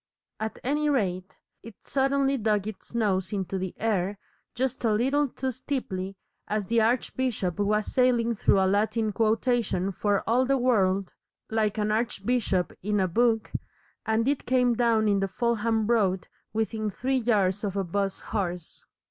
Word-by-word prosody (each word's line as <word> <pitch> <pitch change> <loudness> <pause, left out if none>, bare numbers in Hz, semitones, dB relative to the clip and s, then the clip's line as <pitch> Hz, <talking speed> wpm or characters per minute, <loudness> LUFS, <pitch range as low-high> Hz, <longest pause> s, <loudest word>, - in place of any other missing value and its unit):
At 220 0 -3
any 295 +3 +1
rate, 185 -9 -1 0.2
it 230 -2 -11
suddenly 275 0 +1
dug 210 -4 +1
its 215 +2 -8
nose 190 -5 +1
into 195 -2 -2
the 185 -1 -4
air 205 -3 0 0.4
just 260 0 -2
a 225 - +3
little 270 +7 +2
too 260 +1 -3
steeply 195 -8 -4 0.3
as 210 -1 -1
the 230 +2 +2
archbishop 230 -5 0
was 210 +1 +1
sailing 240 -2 +2
through 200 - +3
a 190 - +3
Latin 215 +3 +1
quotation 220 -3 +1
for 200 +2 0
all 240 +3 +3
the 270 +1 +2
world 195 -7 +1 0.4
like 220 -1 +1
an 210 0 0
archbishop 215 -3 0
in 210 +2 0
a 190 - +2
book, 225 +3 +1 0.5
and 220 +2 +1
it 285 -1 0
came 250 -1 +3
down 230 -2 +2
in 200 -1 +3
the 195 - 0
Fulham 225 +1 0
Road 200 -5 +1 0.2
within 220 -1 -1
three 260 +7 -1
yards 205 -5 +1
of 200 -1 -2
a 195 - +1
'bus 195 +2 -2
horse. 180 -5 -4
220 Hz, 155 wpm, -27 LUFS, 195-240 Hz, 0.5 s, a